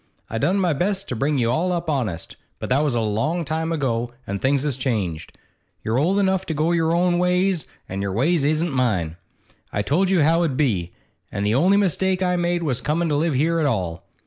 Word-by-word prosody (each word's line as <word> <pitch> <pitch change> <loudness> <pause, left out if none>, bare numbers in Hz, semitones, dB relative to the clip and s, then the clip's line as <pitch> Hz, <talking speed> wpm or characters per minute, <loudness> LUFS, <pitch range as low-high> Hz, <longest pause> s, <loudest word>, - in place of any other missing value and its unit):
I 115 - -2
done 185 - +2
my 180 -4 +2
best 195 +6 -1
to 125 - -2
bring 140 +5 0
you 120 -2 +1
all 175 +8 0
up 175 -1 -2
honest, 115 - -2 0.2
but - - -6
that 135 +4 +3
was 145 -5 0
a 115 - +1
long 135 +11 -1
time 160 +2 -2
ago, 120 -7 -1 0.2
and 100 0 -4
things 135 0 +2
has 145 -4 -1
changed. 105 - -3 0.5
You're 115 +4 0
old 180 +7 +2
enough 190 -2 +2
to 160 - -2
go 155 +3 +1
your 165 -1 +2
own 175 +1 +2
ways, 180 -1 +1 0.2
an' 95 +1 -4
your 100 -1 -2
ways 140 - +1
isn't 155 +3 +1
mine. 95 -11 0 0.5
I 100 - -1
told 175 - +1
you 185 -5 +3
how 165 +3 +3
it - - +3
'ud - - -5
be, 95 - 0 0.4
an' 100 - -3
the 105 +1 +1
only 180 +10 +4
mistake 190 -1 +1
I 180 0 +1
made 175 0 0
was 130 -6 -1
comin' 165 +3 0
to 150 - +1
live 155 0 +1
here 165 +5 +2
at 155 - +2
all. 90 -9 -2
150 Hz, 225 wpm, -22 LUFS, 115-175 Hz, 0.5 s, only